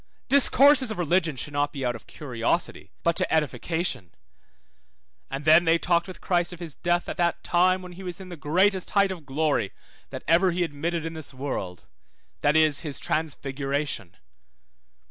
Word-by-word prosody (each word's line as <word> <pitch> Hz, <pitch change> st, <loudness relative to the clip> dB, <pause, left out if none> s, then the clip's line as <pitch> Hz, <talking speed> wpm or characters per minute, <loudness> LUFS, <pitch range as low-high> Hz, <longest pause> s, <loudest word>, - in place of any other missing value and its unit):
Discourses 280 Hz, -1 st, +5 dB
of 220 Hz, -, -3 dB
religion 170 Hz, -2 st, +1 dB
should 145 Hz, +3 st, -6 dB
not 145 Hz, 0 st, 0 dB
be 135 Hz, -3 st, -4 dB
out 120 Hz, 0 st, 0 dB
of 115 Hz, -, -12 dB
curiosity, 125 Hz, +3 st, -2 dB
but 170 Hz, 0 st, +2 dB
to -, -, 0 dB
edification. 155 Hz, -, -1 dB, 1.1 s
And 135 Hz, +2 st, -5 dB
then 160 Hz, +2 st, +7 dB
they 165 Hz, 0 st, +4 dB
talked 170 Hz, +2 st, +1 dB
with 185 Hz, -, -9 dB
Christ 175 Hz, -1 st, +1 dB
of 175 Hz, -, -9 dB
his 165 Hz, -4 st, -6 dB
death 175 Hz, +2 st, 0 dB
at -, -, -5 dB
that 170 Hz, -1 st, 0 dB
time 185 Hz, +1 st, +2 dB
when 180 Hz, -, -9 dB
he 180 Hz, +2 st, -11 dB
was 180 Hz, -1 st, -6 dB
in 190 Hz, -1 st, -10 dB
the 175 Hz, -, -7 dB
greatest 185 Hz, +5 st, +1 dB
height 200 Hz, -1 st, +4 dB
of 165 Hz, -6 st, -8 dB
glory, 140 Hz, -7 st, 0 dB, 0.4 s
that -, -, -7 dB
ever 175 Hz, +3 st, +4 dB
he 175 Hz, 0 st, 0 dB
admitted 165 Hz, +1 st, -3 dB
in 165 Hz, -, -4 dB
this 155 Hz, -4 st, -8 dB
world, 130 Hz, -10 st, -5 dB, 0.5 s
that 145 Hz, +1 st, +2 dB
is, 155 Hz, -2 st, +4 dB
his 150 Hz, -4 st, -5 dB
transfiguration. 140 Hz, -, -3 dB
160 Hz, 175 wpm, -26 LUFS, 145-180 Hz, 1.1 s, then